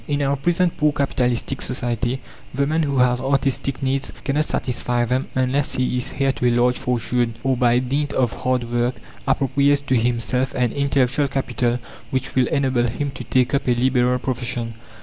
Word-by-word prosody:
In 145 -1 0
our 140 0 +1
present, 175 +5 +1
poor 150 0 +3
capitalistic 130 -2 0
society, 120 0 -1 0.3
the 140 +1 +2
man 155 +3 +1
who 140 -3 0
has 125 0 +3
artistic 135 0 0
needs 135 +1 0
cannot 145 +2 +1
satisfy 120 -3 0
them 125 +3 -1
unless 130 +2 +1
he 125 0 0
is 125 +2 -2
heir 135 0 +2
to 125 - -1
a 120 0 +2
large 125 +1 +2
fortune, 120 -1 -1
or 135 -1 +2
by 120 -1 +3
dint 140 +4 -1
of 125 -5 0
hard 125 -1 +1
work 120 +1 +1 0.3
appropriates 140 +1 +2
to 135 -2 0
himself 120 +2 0
an 125 -3 +1
intellectual 140 0 +1
capital 125 -3 -1 0.3
which 130 0 -2
will 130 -2 +3
enable 130 -3 +1
him 140 +5 -3
to 130 - -8
take 125 +3 +1
up 140 - 0
a 125 - +3
liberal 125 0 +2
profession. 120 -2 -3
130 Hz, 180 wpm, -21 LUFS, 125-140 Hz, 0.3 s, poor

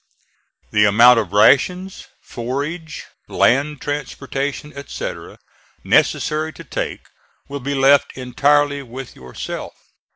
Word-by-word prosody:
The 105 0 +4
amount 115 +4 +6
of 100 -5 -4
rations, 180 - +2 0.2
forage, 145 +7 -5 0.2
land 140 +3 +1
transportation, 145 0 -4
etc., 140 0 -7 0.5
necessary 155 +1 +1
to 165 - -11
take, 145 - -4 0.5
will 140 0 -6
be 140 +2 -3
left 135 +1 +3
entirely 140 +3 +1
with 130 0 -9
yourself. 65 -1 -7
140 Hz, 100 wpm, -19 LUFS, 125-145 Hz, 0.5 s, amount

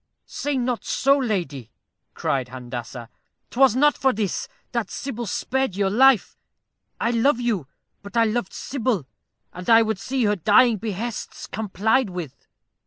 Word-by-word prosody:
"Say 290 -1 -3
not 245 -1 -1
so, 275 +1 +3
lady," 175 - -2 0.5
cried 130 -2 -1
Handassah 120 -1 -7 0.4
"'twas 260 -2 +4
not 295 +3 +4
for 265 - +2
this 210 -5 -2 0.2
that 235 -5 -2
Sybil 240 -4 -5
spared 265 +1 -1
your 195 -1 +1
life. 260 0 +4 0.6
I 230 - +1
love 240 +3 +2
you, 220 - -1 0.3
but 200 +3 -7
I 230 - +6
loved 220 -3 -1
Sybil, 235 - -2 0.5
and 180 +3 -7
I 225 0 +7
would 220 -3 -2
see 255 +5 -1
her 210 -1 +2
dying 215 +6 +4
behests 220 +2 -5
complied 220 +3 0
with." 170 -7 -8
220 Hz, 145 wpm, -23 LUFS, 185-250 Hz, 0.6 s, I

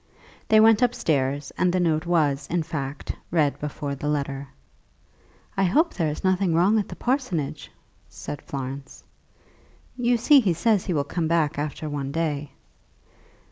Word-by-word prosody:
They 220 - +6
went 220 0 +6
upstairs, 145 - 0
and 180 - +3
the 185 - +1
note 165 -1 +1
was, 150 -5 +1
in 170 -1 0
fact, 145 -4 -5 0.2
read 155 -4 +1
before 145 -1 -4
the 140 +2 -5
letter. 140 -2 -2 1.1
"I 195 - +2
hope 315 - +2
there 165 -4 0
is 150 - -5
nothing 185 -2 +2
wrong 195 +6 +4
at 205 - -3
the - - -7
parsonage," 245 - -2 0.4
said 145 - -7
Florence. 135 0 -7 0.9
"You 245 -1 +2
see 280 +5 +6
he 200 -9 +2
says 200 +3 +1
he 180 - -1
will 145 - +1
be 160 +3 -2
back 160 -3 +1
after 150 +1 -4
one 140 -2 -3
day." 150 -2 -2
160 Hz, 155 wpm, -24 LUFS, 145-190 Hz, 1.1 s, They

